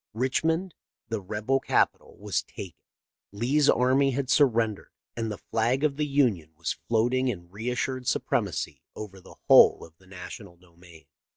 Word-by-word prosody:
Richmond, 160 +8 0 0.4
the 110 -2 -2
rebel 105 +7 -1
capital, - - 0
was - - -1
taken; 95 -4 -9 0.6
Lee's 130 +8 +2
army 130 +3 +3
had 135 0 -2
surren 115 -7 +3
dered; - - -17 0.3
and 115 -2 -3
the 105 - -5
flag 120 +5 -1
of 145 -2 +1
the 150 -1 0
Union 115 - +1
was 85 +1 -3
floating 120 +3 +1
in 85 -7 -4
reassured 125 +4 -3
supremacy - - -1
over 95 -3 -9
the - - -15
whole - - +7
of 80 - -19
the 95 - -22
National 90 0 -10
domain. 85 -2 -18
115 Hz, 155 wpm, -27 LUFS, 95-130 Hz, 0.6 s, whole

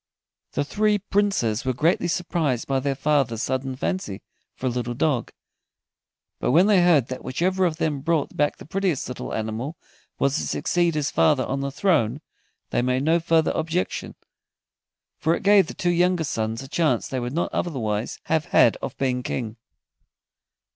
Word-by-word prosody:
The - - 0
three 210 +6 +2
Princes 195 - 0
were 130 -1 -1
greatly 170 +6 +2
surprised 165 -8 -1
by 135 -1 +1
their 135 +1 -1
father's 135 -6 +1
sudden 130 0 -2
fancy 130 - -3 0.3
for - - -7
a - - +2
little 120 0 -3
dog, 140 -2 0 1.1
but - - 0
when 165 +9 +5
they 205 -3 +5
heard 165 -8 +4
that 130 - -6
whichever 185 +8 0
of 160 -2 -4
them 155 -4 -1
brought 160 -1 0
back 145 0 +1
the - - -12
prettiest 185 -4 -1
little 125 - -6
animal 110 +8 -3 0.4
was 140 0 +1
to - - -2
succeed 175 -2 +1
his 150 -2 -1
father 145 -4 +3
on 135 - -2
the 140 0 -2
throne, 140 - +1 0.5
they - - +1
made 125 +1 0
no 165 +3 +3
further 165 -1 +2
objection, 165 +3 -2 1.0
for 165 0 +2
it - - -7
gave 200 -2 +5
the - - -8
two 175 - 0
younger 175 0 +2
sons 115 -4 -2
a - - -9
chance 160 +2 +1
they 130 - -3
would 120 0 -3
not 170 - -1
otherwise 115 -9 -2
have 160 -1 0
had 115 - +4
of - - -6
being 125 -2 0
King. 115 -3 -4
145 Hz, 175 wpm, -24 LUFS, 125-170 Hz, 1.1 s, when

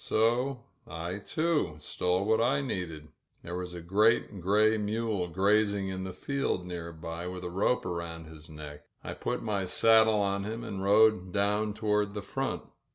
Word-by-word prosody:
So 120 +3 +1 0.2
I, 85 +1 -5
too, 155 - 0
stole 90 +5 -1
what 110 +1 +3
I 135 +4 +2
needed. 85 - -4 0.3
There 85 - -5
was 90 -1 -5
a 85 - -6
great 105 +2 +2
gray 105 +4 +4
mule 105 -3 -1
grazing 100 +2 +2
in 95 0 -4
the 95 - -4
field 135 -2 -2
near 85 -2 -5
by, 85 +1 -6
with 90 0 -6
a 90 - -4
rope 100 +6 +1
around 85 -2 -4
his 80 0 -13
neck. 75 -1 -9 0.2
I - - -5
put - - -3
my 100 -4 -1
saddle 110 +3 +5
on 100 -1 0
him 110 +3 -4
and 100 -4 -5
rode 105 -2 +4
down 105 +2 +1
toward 105 -1 0
the 105 - -4
front. - - -3
100 Hz, 170 wpm, -29 LUFS, 90-110 Hz, 0.3 s, saddle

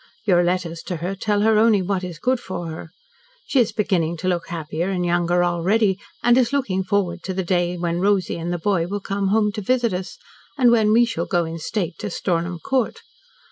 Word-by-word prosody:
Your 175 -4 +4
letters 175 -2 -1
to 180 - -2
her 175 +4 -3
tell 205 +1 0
her 220 0 +4
only 215 -3 +4
what 190 0 -1
is 175 -3 -6
good 255 +8 0
for 175 -6 -5
her. 160 +1 -8 0.6
She 270 - +1
is 235 - +3
beginning 170 -6 0
to 185 - -4
look 175 -2 -1
happier 165 +1 -3
and 180 -2 -1
younger 175 0 +2
already, 190 +3 +1 0.2
and 240 0 +5
is 250 -1 +2
looking 225 -10 0
forward 185 -3 -1
to 190 - -5
the 190 - -1
day 175 0 0
when 170 0 -1
Rosy 195 -3 +1
and 170 +1 -3
the 175 - -1
boy 175 -2 0
will 205 +2 -3
come 195 0 -2
home 210 +1 +2
to 210 - -5
visit 240 0 +1
us, 180 0 -5 0.4
and 245 -4 +5
when 220 -3 +4
we 235 +2 +5
shall 170 -7 -3
go 175 -2 +1
in 165 +1 -6
state 170 0 -3
to - - -4
Stornham 175 -1 -2
Court. 255 +7 -1
185 Hz, 220 wpm, -22 LUFS, 175-210 Hz, 0.6 s, and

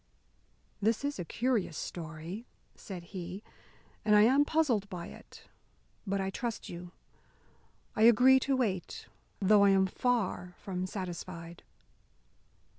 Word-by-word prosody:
"This 225 +6 +1
is 285 -7 -2
a - - -1
curious 225 -5 0
story," 165 +6 -6 0.3
said 185 -5 -8
he, 185 +2 -6 0.6
"and 210 -1 +4
I 210 - +7
am 270 +6 +5
puzzled 255 -11 +1
by 175 -2 -6
it. - - -14 0.6
But 195 0 0
I 190 0 -1
trust 235 +2 -4
you, 175 0 -8 1.0
I 215 - -1
agree 250 +3 +7
to 270 +1 0
wait, 200 -9 -2 0.3
though 205 +1 +5
I 200 - +6
am 190 -1 +4
far 190 -4 -1
from 185 -2 -4
satisfied." 175 -3 -6
195 Hz, 125 wpm, -31 LUFS, 180-235 Hz, 1.0 s, I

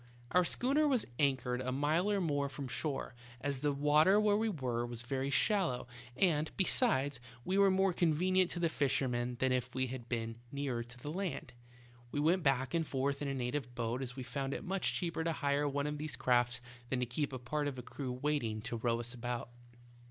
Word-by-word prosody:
"Our 180 - +5
schooner 275 - +2
was 260 -5 +2
anchored 130 -3 +1
a 130 0 -2
mile 155 +8 +1
or 200 - +2
more 145 -5 0
from 140 0 -5
shore, 130 +3 -2 0.3
as 140 0 -2
the 145 +1 +1
water 150 +7 +5
where 210 -1 +4
we 220 +1 +1
were 125 - -1
was 120 -1 -5
very 135 +2 -2
shallow, 155 -1 +2 0.3
and, 155 -2 +2
besides, 145 - +3 0.3
we 190 +2 +1
were 200 0 +6
more 190 0 +3
convenient 180 +3 +3
to 175 - -2
the 170 - +3
fishermen 125 -5 0
than 130 0 +2
if 125 -1 -1
we 130 0 +2
had 125 -2 -7
been 115 -1 -2
nearer 135 -4 -2
to 120 +1 -13
the 145 +4 -6
land. 165 -8 -3 0.6
We 145 - -1
went 170 +5 +3
back 135 -2 +1
and 165 -2 +1
forth 140 +1 -1
in 145 - -1
a 135 - -1
native 125 0 -3
boat, 120 +2 -2
as 125 -2 -5
we 130 - -5
found 135 +2 -3
it - - -5
much 190 +1 0
cheaper 170 -2 -2
to 165 0 0
hire 145 -1 +1
one 140 +1 -1
of 150 0 -3
these 150 -4 -2
crafts 120 -2 +2 0.3
than 130 - 0
to - - +2
keep 140 +5 -2
a 130 - -4
part 145 +4 -2
of 135 -2 -4
a 125 - -6
crew 130 +1 -5
waiting 125 -5 -1
to 115 - -3
row 115 0 0
us 120 +1 -2
about. 120 -1 -4
140 Hz, 210 wpm, -34 LUFS, 125-160 Hz, 0.6 s, were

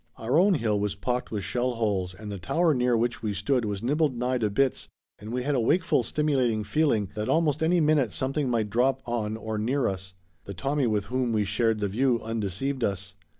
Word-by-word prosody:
Our 125 +8 +1
own 195 +1 +4
hill 110 -6 0
was 100 -1 -1
pocked 125 +5 -2
with 105 -3 -3
shell 120 +7 -1
holes 100 -5 -1
and 105 +1 -8
the 100 - -5
tower 160 - +2
near 125 -2 +2
which 120 +1 -1
we 105 -3 -2
stood 115 +5 0
was 100 0 -3
nibbled 145 0 +1
nigh 125 +1 0
to 110 -2 +1
bits 135 +5 0 0.3
and 105 +2 -8
we 125 +1 -2
had 145 +2 0
a 130 - +2
wakeful, 160 +4 +2
stimulating 125 -4 0
feeling 115 - +1
that 105 0 -3
almost 155 -2 +2
any 170 +2 +3
minute 150 -7 +3
something 135 +3 -1
might 110 -4 0
drop 130 +4 +1
on 110 -3 -2
or 110 -1 -4
near 125 +4 +1
us. 95 -1 -5 0.3
The 100 - -7
Tommy 140 +3 0
with 105 -3 0
whom 130 -2 +1
we 105 -1 +2
shared 110 +2 0
the 100 - +1
view 120 +4 +1
undeceived 115 +4 -3
us. 95 -1 -2
120 Hz, 215 wpm, -27 LUFS, 105-135 Hz, 0.3 s, own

